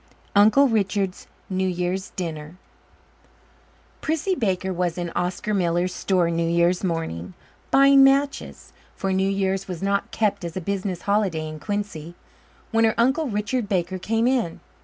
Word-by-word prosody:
Uncle 215 Hz, +8 st, +6 dB
Richard's 200 Hz, -4 st, -1 dB, 0.2 s
New 190 Hz, 0 st, -1 dB
Year's 180 Hz, +1 st, -2 dB
Dinner 160 Hz, -3 st, -5 dB, 1.5 s
Prissy 320 Hz, +4 st, 0 dB
Baker 190 Hz, -, -1 dB
was 175 Hz, -1 st, -1 dB
in 175 Hz, -1 st, -3 dB
Oscar 180 Hz, +5 st, -2 dB
Miller's 175 Hz, -1 st, +1 dB
store 180 Hz, -3 st, +1 dB
New 165 Hz, 0 st, 0 dB
Year's 170 Hz, +2 st, +2 dB
morning, 95 Hz, -, -3 dB, 0.3 s
buying 275 Hz, 0 st, +6 dB
matches 275 Hz, +1 st, +1 dB, 0.2 s
for 195 Hz, -1 st, -2 dB
New 190 Hz, +1 st, +1 dB
Year's 195 Hz, -1 st, -1 dB
was 180 Hz, -1 st, -6 dB
not 200 Hz, 0 st, 0 dB
kept 210 Hz, -4 st, 0 dB
as 170 Hz, +1 st, -5 dB
a -, -, 0 dB
business 190 Hz, -1 st, -3 dB
holiday 195 Hz, -6 st, 0 dB
in 155 Hz, 0 st, -7 dB
Quincy 200 Hz, -5 st, -4 dB, 0.6 s
when 225 Hz, 0 st, +3 dB
her 220 Hz, -1 st, +3 dB
uncle, 265 Hz, +7 st, +2 dB
Richard 210 Hz, +1 st, -2 dB
Baker, 185 Hz, -1 st, -1 dB
came 225 Hz, +4 st, 0 dB
in. 245 Hz, -10 st, 0 dB
190 Hz, 145 wpm, -23 LUFS, 175-215 Hz, 1.5 s, Uncle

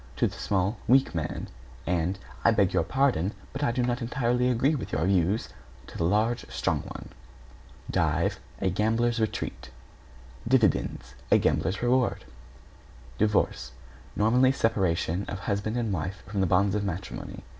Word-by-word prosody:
to -, -, +2 dB
the -, -, -2 dB
small, 100 Hz, +3 st, 0 dB
weak 130 Hz, 0 st, +4 dB
man, 80 Hz, -2 st, -3 dB, 0.4 s
and 90 Hz, +1 st, 0 dB, 0.3 s
"I -, -, +6 dB
beg 100 Hz, -4 st, +3 dB
your -, -, +3 dB
pardon, 125 Hz, -8 st, +1 dB, 0.2 s
but 140 Hz, -, -5 dB
I 120 Hz, -, +2 dB
do 125 Hz, +1 st, 0 dB
not 120 Hz, +1 st, -1 dB
entirely 125 Hz, 0 st, +1 dB
agree 125 Hz, +5 st, +2 dB
with 140 Hz, -, -4 dB
your 80 Hz, +2 st, 0 dB
views," 95 Hz, +3 st, +1 dB, 0.4 s
to -, -, -13 dB
the 85 Hz, -, 0 dB
large, 110 Hz, +6 st, +1 dB
strong 65 Hz, -1 st, 0 dB
one. -, -, -9 dB, 0.8 s
=DIVE= -, -, +1 dB, 0.2 s
A 95 Hz, -, +1 dB
gambler's 115 Hz, +4 st, +1 dB
retreat. 110 Hz, -1 st, -3 dB, 0.8 s
=DIVIDENDS= 110 Hz, -, +1 dB, 0.2 s
A -, -, +7 dB
gambler's 95 Hz, +4 st, 0 dB
reward. 125 Hz, 0 st, +1 dB, 0.9 s
=DIVORCE= 100 Hz, -, +1 dB, 0.4 s
Nominally, 125 Hz, +5 st, +4 dB
separation 95 Hz, -7 st, 0 dB
of 100 Hz, -1 st, -5 dB
husband 105 Hz, +3 st, -2 dB
and 115 Hz, -4 st, -1 dB
wife 90 Hz, +3 st, -4 dB
from 100 Hz, +1 st, -4 dB
the 95 Hz, -, +2 dB
bonds 95 Hz, +2 st, +3 dB
of 105 Hz, -1 st, 0 dB
matrimony. 95 Hz, -1 st, -5 dB
105 Hz, 150 wpm, -27 LUFS, 95-120 Hz, 0.9 s, A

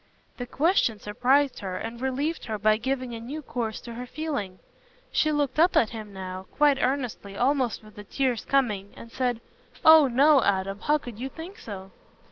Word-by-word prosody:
The 245 Hz, -, -5 dB
question 280 Hz, -, +2 dB
surprised 255 Hz, +7 st, +1 dB
her, 185 Hz, -2 st, -4 dB
and 230 Hz, +4 st, -6 dB
relieved 275 Hz, +5 st, -2 dB
her 220 Hz, -2 st, -3 dB
by 215 Hz, +1 st, +3 dB
giving 255 Hz, +1 st, -3 dB
a 230 Hz, -, -5 dB
new 280 Hz, +7 st, -7 dB
course 230 Hz, -5 st, -3 dB
to 235 Hz, -, -9 dB
her 250 Hz, +2 st, -7 dB
feeling. 245 Hz, -12 st, -4 dB, 0.5 s
She 310 Hz, -, +2 dB
looked 290 Hz, -1 st, 0 dB
up 345 Hz, +3 st, +4 dB
at 220 Hz, -, +3 dB
him 215 Hz, -2 st, -8 dB
now, 185 Hz, -1 st, -7 dB
quite 290 Hz, -2 st, +4 dB
earnestly, 245 Hz, -6 st, -2 dB
almost 255 Hz, -3 st, +1 dB
with 215 Hz, -1 st, -16 dB
the 210 Hz, -, -8 dB
tears 250 Hz, +2 st, -1 dB
coming, 210 Hz, -8 st, 0 dB
and 230 Hz, -, -11 dB
said, 245 Hz, -3 st, -1 dB, 0.4 s
"Oh, 315 Hz, -2 st, +9 dB
no, 275 Hz, +3 st, +5 dB
Adam! 195 Hz, 0 st, 0 dB
how 300 Hz, +6 st, +2 dB
could 245 Hz, -6 st, -10 dB
you 265 Hz, +2 st, -4 dB
think 335 Hz, +7 st, -10 dB
so?" 195 Hz, -3 st, -8 dB
245 Hz, 185 wpm, -26 LUFS, 215-280 Hz, 0.5 s, Oh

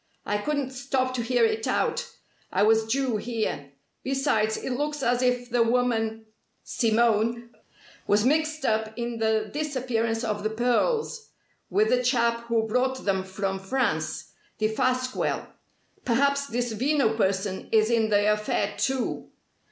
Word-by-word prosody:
I 205 Hz, -, 0 dB
couldn't 285 Hz, +2 st, -2 dB
stop 260 Hz, 0 st, -1 dB
to 250 Hz, -, -1 dB
hear 240 Hz, 0 st, +2 dB
it 220 Hz, 0 st, -1 dB
out. 480 Hz, -, 0 dB, 0.4 s
I 195 Hz, -, +2 dB
was 220 Hz, +1 st, +4 dB
due 255 Hz, -1 st, 0 dB
here. 215 Hz, -11 st, -3 dB, 0.3 s
Besides, 265 Hz, -5 st, +1 dB
it -, -, -4 dB
looks 295 Hz, +2 st, -2 dB
as 245 Hz, 0 st, +2 dB
if 245 Hz, -1 st, 0 dB
the 240 Hz, 0 st, +3 dB
woman 225 Hz, -2 st, +1 dB, 0.4 s
Simone 235 Hz, +1 st, +1 dB, 0.6 s
was 210 Hz, +2 st, +3 dB
mixed 310 Hz, +1 st, +1 dB
up 220 Hz, -1 st, 0 dB
in 235 Hz, -1 st, -3 dB
the 220 Hz, -1 st, +1 dB
disappearance 250 Hz, -6 st, -1 dB
of 210 Hz, -2 st, -2 dB
the 215 Hz, -, -1 dB
pearls, 345 Hz, -, 0 dB, 0.4 s
with 425 Hz, +2 st, +2 dB
the 250 Hz, -, +3 dB
chap 235 Hz, -2 st, +1 dB
who 230 Hz, -1 st, +1 dB
brought 255 Hz, +4 st, 0 dB
them 190 Hz, -2 st, +1 dB
from 190 Hz, 0 st, -3 dB
France 260 Hz, +8 st, -2 dB, 0.3 s
Defasquelle. 255 Hz, +4 st, 0 dB, 0.6 s
Perhaps 280 Hz, +3 st, +2 dB
this 240 Hz, -1 st, -2 dB
Veno 255 Hz, -1 st, +1 dB
person 190 Hz, -2 st, -1 dB
is 220 Hz, +1 st, +3 dB
in 225 Hz, -2 st, +2 dB
the 205 Hz, 0 st, +3 dB
affair, 210 Hz, -1 st, -1 dB
too. 265 Hz, -2 st, -1 dB
235 Hz, 140 wpm, -26 LUFS, 220-260 Hz, 0.6 s, was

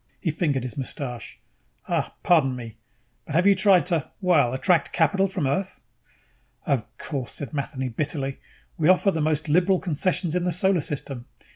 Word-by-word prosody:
He 165 Hz, -, -1 dB
fingered 145 Hz, -5 st, 0 dB
his 130 Hz, +3 st, -5 dB
mustache. 125 Hz, -3 st, -6 dB, 0.5 s
"Uh, -, -, 0 dB
pardon 145 Hz, -7 st, +4 dB
me, 115 Hz, -3 st, -8 dB, 0.5 s
but 150 Hz, -, -4 dB
have 175 Hz, +3 st, +3 dB
you 200 Hz, -, +7 dB
tried 190 Hz, -1 st, +4 dB
to, 170 Hz, -5 st, -1 dB
well, 170 Hz, -10 st, +3 dB
attract 160 Hz, +4 st, +2 dB
capital 185 Hz, +4 st, +2 dB
from 185 Hz, -5 st, -2 dB
Earth?" 190 Hz, +8 st, -2 dB, 0.8 s
"Of 140 Hz, -, +1 dB
course," 135 Hz, -5 st, -5 dB
said 140 Hz, -5 st, -7 dB
Matheny 140 Hz, -2 st, -3 dB
bitterly. 140 Hz, +2 st, -3 dB, 0.4 s
"We 155 Hz, +1 st, +3 dB
offer 185 Hz, +2 st, +5 dB
the 160 Hz, -, -2 dB
most 155 Hz, 0 st, 0 dB
liberal 180 Hz, +5 st, +3 dB
concessions 175 Hz, 0 st, -1 dB
in 180 Hz, 0 st, 0 dB
the 180 Hz, -, 0 dB
Solar 185 Hz, 0 st, +2 dB
System. 135 Hz, -4 st, -5 dB
155 Hz, 165 wpm, -25 LUFS, 135-180 Hz, 0.8 s, you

